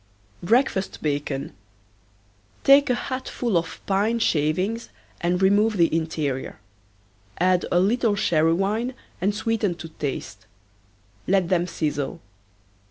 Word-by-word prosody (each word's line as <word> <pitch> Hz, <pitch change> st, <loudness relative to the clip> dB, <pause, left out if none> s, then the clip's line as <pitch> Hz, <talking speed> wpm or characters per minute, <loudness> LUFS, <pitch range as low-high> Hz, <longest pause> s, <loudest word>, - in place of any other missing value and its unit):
BREAKFAST 205 Hz, -1 st, +1 dB
BACON. 145 Hz, -2 st, -2 dB, 1.1 s
Take 280 Hz, 0 st, +6 dB
a 250 Hz, -, +3 dB
hat 260 Hz, +1 st, -4 dB
full 235 Hz, -6 st, -2 dB
of 170 Hz, 0 st, -1 dB
pine 205 Hz, +4 st, +1 dB
shavings 185 Hz, +4 st, 0 dB, 0.3 s
and 175 Hz, +1 st, 0 dB
remove 205 Hz, +3 st, +3 dB
the 165 Hz, -2 st, +3 dB
interior. 155 Hz, -5 st, -2 dB, 0.8 s
Add 180 Hz, 0 st, +2 dB
a 175 Hz, -, +4 dB
little 220 Hz, +3 st, +2 dB
sherry 165 Hz, -4 st, +2 dB
wine 215 Hz, +8 st, -1 dB, 0.3 s
and 200 Hz, +3 st, +1 dB
sweeten 220 Hz, -4 st, 0 dB
to 170 Hz, -1 st, -9 dB
taste. 120 Hz, -8 st, -6 dB, 0.8 s
Let 185 Hz, -2 st, +2 dB
them 175 Hz, -1 st, +2 dB
sizzle. 145 Hz, -5 st, -3 dB
185 Hz, 115 wpm, -24 LUFS, 160-220 Hz, 1.1 s, Take